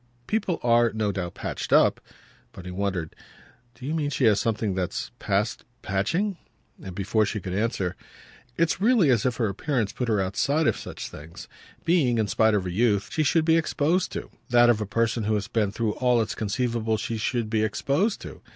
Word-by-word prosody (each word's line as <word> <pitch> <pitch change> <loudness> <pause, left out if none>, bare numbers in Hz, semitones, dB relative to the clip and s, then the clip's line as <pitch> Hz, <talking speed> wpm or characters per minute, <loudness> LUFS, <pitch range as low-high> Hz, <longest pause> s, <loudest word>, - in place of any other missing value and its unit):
"People 200 - -1
are, 120 -1 +4
no 110 -2 -1
doubt, 90 -3 -4
patched - - -5
up." - - +4 0.5
But 90 - -10
he 90 - -6
wondered. 95 -3 -3 0.6
"Do 120 - -10
you 150 - -2
mean 150 -3 0
she 140 - -2
has 105 -3 +4
something 110 -3 -1
that's 90 -1 -3
past 100 +3 -1 0.2
patching?" 165 - 0 0.4
And 95 -2 -8
before 105 +3 +1
she 105 +1 -2
could 90 -2 -5
answer: 100 -3 -1 0.6
"It's 165 +2 +1
really 215 - +4
as 120 -1 +2
if 125 - -1
her 115 -2 0
appearance 110 +1 -1
put 125 - -3
her 110 -3 +2
outside 140 +11 +1
of - - +3
such - - -7
things 75 +2 -11 0.4
being, 145 -9 +3
in 110 - +2
spite 110 +2 +3
of 100 - +1
her 90 - -4
youth, 100 +1 +1
that 160 -5 +2
of 110 -2 -1
a - - -1
person 115 +1 0
who 110 0 +1
has 105 0 -2
been 110 -2 0
through 110 0 -1
all 125 -2 +2
it's 110 - -1
conceivable 115 +1 -1
she 115 +1 -3
should 115 +1 -1
be 110 0 0
exposed 145 - 0
to. - - -9
115 Hz, 185 wpm, -25 LUFS, 100-135 Hz, 0.6 s, are